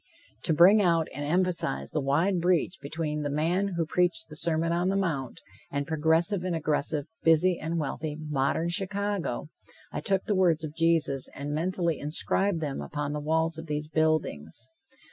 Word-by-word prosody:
To 165 - +3
bring 190 +7 +7
out 170 -4 +2
and 145 +2 -5
emphasize 170 - 0
the - - -1
wide 165 +7 +1
breach 180 +1 +1
between 150 +1 -3
the 145 - -2
man 175 +6 0
who 165 - +1
preached 165 -1 0
the 155 - -10
Sermon 165 +1 0
on 175 +2 +1
the 195 - 0
Mount, 150 -10 -2 0.3
and 140 0 -2
progressive 160 +5 +2
and 180 -2 -1
aggressive, 150 -1 -1 0.2
busy 165 +2 +4
and 165 +2 -2
wealthy, 150 0 -3
modern 150 +2 0
Chicago, 195 - -2 0.4
I - - -4
took 195 -1 0
the 215 - 0
words 175 -4 +2
of 150 -1 -5
Jesus 165 -5 +1
and 145 +1 -4
mentally 170 0 -1
inscribed 165 +4 0
them 145 -3 -3
upon 145 -1 -4
the 150 - -2
walls 160 +2 0
of 160 - -8
these 150 0 -3
buildings. 155 - -1
160 Hz, 170 wpm, -28 LUFS, 150-175 Hz, 0.4 s, bring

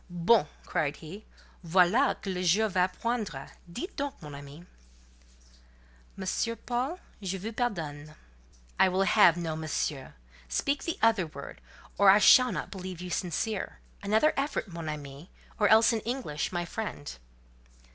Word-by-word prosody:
"Bon!" 175 +2 +3
he - - -24
cried. 155 -5 -1 0.7
"Voilà 185 - +3
que 195 - -4
le 180 - -3
jour 205 +5 +3
va 185 -1 +2
poindre! 210 - -4 0.2
Dites 345 - -6
donc, 285 -2 -4
mon 150 -2 -10
ami." 140 +4 -11 1.5
"Monsieur 195 +4 -1
Paul, 250 - -3 0.2
je 190 -1 -3
vous 210 +4 -5
pardonne." 155 - -3 0.6
"I 190 - +6
will 185 +1 +1
have 195 -4 +5
no 165 -2 -3
monsieur: 150 - -3 0.3
speak 280 - -1
the 335 - -2
other 220 -6 +3
word, 140 -2 -10 0.4
or 200 -1 +7
I 195 - +8
shall 250 +4 +7
not - - -4
believe 185 -3 -7
you 180 0 -7
sincere: 190 +4 -2 0.2
another 215 +9 +3
effort—mon 190 - -3
ami, 145 +1 -8 0.3
or 210 - +4
else 225 +2 +6
in 225 - 0
English,—my 185 - -3
friend!" 170 - -6
185 Hz, 140 wpm, -29 LUFS, 160-225 Hz, 1.5 s, I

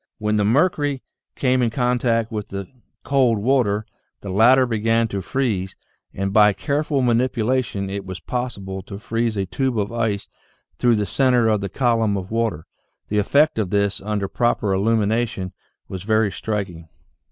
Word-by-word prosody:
When 105 0 0
the 105 - +2
mercury 145 - +1 0.3
came 130 -1 +1
in 120 - +2
contact 120 -2 0
with 105 -2 -4
the 100 -1 -6 0.4
cold 130 -5 +2
water, 110 -2 +1 0.4
the 100 - -6
latter 125 +6 +5
began 115 0 +1
to 100 -2 -3
freeze 100 -4 -2 0.4
and 95 0 -3
by 105 -1 +6
careful 145 +4 -1
manipulation 120 -3 0
it 100 +1 -4
was 95 -2 -7
possible 100 -4 -4
to 100 +1 -9
freeze 115 +1 -2
a 95 - 0
tube 130 +5 -1
of 100 0 -1
ice 110 -4 -1 0.5
through 120 -1 +4
the 105 -1 0
center 125 -1 +2
of 105 -2 +1
the 100 - -3
column 115 -5 +1
of 95 +1 -6
water. 115 -8 -1 0.4
The 105 - +1
effect 140 +6 +3
of 100 -4 -1
this 100 0 0
under 105 -1 -2
proper 110 -3 0
illumination 110 -1 0 0.3
was 95 -2 -6
very 110 +1 +1
striking. 95 -6 -4
110 Hz, 160 wpm, -22 LUFS, 100-125 Hz, 0.5 s, by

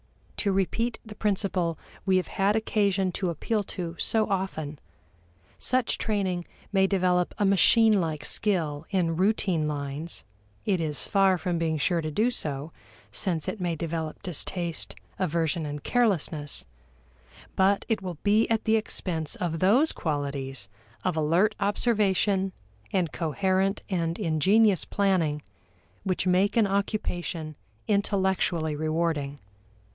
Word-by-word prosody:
To 200 - +1
repeat 220 +5 0
the 215 - -9
principle 190 -6 0 0.3
we 190 -1 +3
have 185 - -1
had 200 +2 +1
occasion 200 -4 +1
to 180 0 -2
appeal 210 +7 -1
to 175 -3 -5
so 220 -1 +2
often, 160 -7 -3 0.8
such 255 -2 +1
training 190 -5 -1 0.3
may 190 -1 +4
develop 180 -2 +1
a 205 - +2
machine 205 +2 +5
like 160 -3 -3
skill 160 -8 +1
in 175 -4 +1
routine 185 -5 +2
lines 145 +2 -4 0.4
(it 190 -4 +1
is 150 -4 -2
far 195 -2 +3
from 175 0 -2
being 160 -1 0
sure 170 +3 +1
to 155 - -3
do 220 +11 +1
so, 150 - -3 0.4
since 170 -6 -2
it 210 - -3
may 175 -2 0
develop 160 -1 -4
distaste, 175 -1 -2 0.2
aversion, 165 -3 0
and 145 -1 -6
carelessness), 170 - 0 0.9
but 195 +1 +3
it 225 -3 0
will 180 -4 -5
be 210 +2 +3
at 225 -1 +1
the 220 0 +3
expense 165 -7 -3
of 165 -2 -2
those 240 - +4
qualities 140 - -3 0.4
of 185 -3 0
alert 165 +7 +3
observation 200 -2 +2 0.4
and 180 -4 +1
coherent 190 +4 0
and 170 -2 0
ingenious 195 +3 +3
planning 175 -7 +1 0.6
which 185 -1 0
make 185 +5 +3
an 225 - +5
occupation 180 -5 -2 0.3
intellectually 190 -6 +1
rewarding. 155 -2 -1
185 Hz, 130 wpm, -27 LUFS, 160-200 Hz, 0.9 s, machine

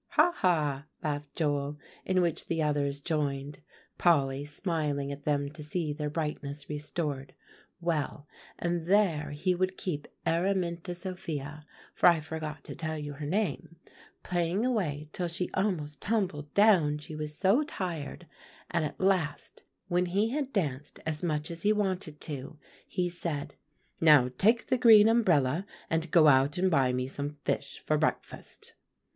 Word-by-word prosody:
"Ha, 355 - +5
ha!" 150 -6 +1 0.2
laughed 145 -1 -3
Joel, 145 -2 -1 0.3
in 185 -1 +2
which 170 -3 -1
the 165 - -1
others 145 -1 0
joined, 145 -2 -2 0.4
Polly 140 -5 +3
smiling 145 -3 -2
at 140 0 -8
them 145 -1 0
to 155 - -10
see 150 0 -2
their 150 0 -3
brightness 150 -2 -4
restored. 150 -2 -4 0.4
"Well, 155 -4 -2 0.3
and 170 -1 -2
there 175 -7 +3
he 150 +6 0
would 185 +1 -1
keep 150 -6 -3 0.2
Araminta 175 0 0
Sophia, 155 -5 -6 0.3
for - - +6
I 170 -2 +3
forgot 155 0 -6
to - - -8
tell 160 -1 -3
you 145 -1 -5
her 145 +1 -6
name, 175 -2 -1 0.5
playing 175 +5 0
away 160 - -1
till 180 - -2
she 170 +2 -3
almost 165 -7 -1
tumbled 180 -9 -1
down 185 -8 +5
she 150 +1 -9
was 150 0 -4
so 200 +8 +4
tired; 175 - -4 0.5
and 170 -2 +1
at 150 - -4
last, 185 -7 0 0.2
when 180 -1 +1
he 200 +5 +1
had 275 +1 -2
danced 150 - -2
as 155 -1 -2
much 155 -2 -1
as 165 0 -6
he 210 - +3
wanted 190 -7 -1
to, 145 0 -6 0.3
he 180 -1 -1
said, 170 -4 -4 0.5
'Now 150 -6 +6
take 225 +4 +4
the 255 -2 +1
green 220 -3 +8
umbrella, 175 - +3 0.3
and 160 0 0
go 155 -1 +6
out 140 +1 +4
and 185 +1 +2
buy 135 -5 +3
me 125 0 -1
some 145 +2 -4
fish 140 - -2
for 155 -1 +2
breakfast. 155 - -3
155 Hz, 155 wpm, -30 LUFS, 145-180 Hz, 0.5 s, green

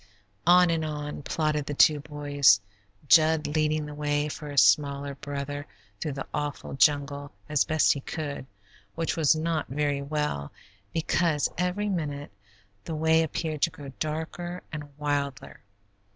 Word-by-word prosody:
On 180 0 +7
and 165 -1 0
on 150 -1 -4
plodded 150 0 -1
the 145 - -3
two 150 +1 +5
boys, 145 -6 +3 0.5
Jud 155 +1 +5
leading 155 0 0
the 150 - -7
way 145 0 -1
for 150 0 -7
his 140 -2 +5
smaller 140 -1 +2
brother 145 +1 -5 0.3
through 150 - -3
the 135 - -5
awful 145 -1 -3
jungle 145 0 +2 0.2
as 150 -2 +2
best 155 -1 +3
he 140 - -5
could, 140 -2 -5 0.5
which 165 0 -1
was 160 -2 +4
not 160 0 -1
very 145 +1 -1
well, 140 - -2 0.4
because 165 -2 +1
every 180 +4 -1
minute 150 -7 -3 0.5
the 160 - -4
way 160 +1 +3
appeared 155 -1 -3
to - - +4
grow 145 -3 -10
darker 160 +3 -4
and 150 -1 -5
wilder. 140 -2 -3
150 Hz, 145 wpm, -27 LUFS, 145-160 Hz, 0.5 s, On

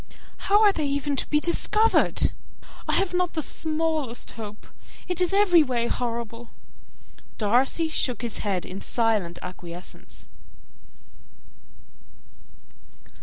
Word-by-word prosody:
How 415 +2 +6
are 410 -2 +6
they 310 - -2
even 280 0 -1
to - - -2
be 300 - +3
discovered? 425 +7 +3 0.6
I - - 0
have 390 -2 +1
not 360 -1 0
the 315 - 0
smallest 310 -6 -1
hope. 215 -2 -9 0.4
It 360 0 -1
is 360 - +2
every 390 -4 +5
way 250 -5 0
horrible!" 235 -1 -4 0.9
Darcy 250 +9 +2
shook 250 -7 -2
his 235 - -3
head 195 -4 -2
in 185 +2 -7
silent 215 -7 0
acquiescence. 180 -1 -10
270 Hz, 115 wpm, -25 LUFS, 225-335 Hz, 0.9 s, How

